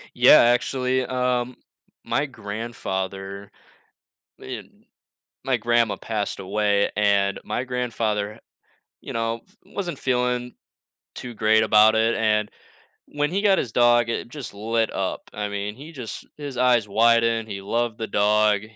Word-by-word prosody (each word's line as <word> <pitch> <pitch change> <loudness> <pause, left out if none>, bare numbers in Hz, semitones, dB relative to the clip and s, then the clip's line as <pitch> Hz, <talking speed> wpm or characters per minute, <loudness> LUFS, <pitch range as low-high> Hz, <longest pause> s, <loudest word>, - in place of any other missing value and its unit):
Yeah, - - +8
actually, 125 +2 +1
um, 125 -1 -1 0.5
my 135 +5 0
grandfather 100 -4 -5 0.9
eh - - -6 0.8
my 130 -2 +1
grandma 120 0 +2
passed 105 -3 -3
away, 100 +1 +1
and 100 -1 +2
my 125 - -2
grandfather, 115 -4 -2 0.6
you - - -8
know, 115 0 -2 0.2
wasn't 180 -4 -5
feeling 125 -1 -1 0.6
too 120 -2 -7
great 110 0 +3
about 110 0 +5
it, 110 +1 +2
and 105 -1 +1 0.6
when 145 +1 -1
he 200 +2 0
got 195 -2 +4
his 115 - -2
dog, 120 -1 +4
i - - 0
it 115 - -4
just 130 -5 -8
lit 110 +2 -1
up, - - -2
I 105 -1 -3
mean, 100 +1 -4
he 145 +6 -11
just 120 -8 -7
his 145 -3 -7
eyes 120 -3 +3
widened, 115 +1 +3
he 100 -1 -5
loved 115 +3 -2
the 110 - -3
dog, 105 0 +2
115 Hz, 140 wpm, -23 LUFS, 105-125 Hz, 0.9 s, Yeah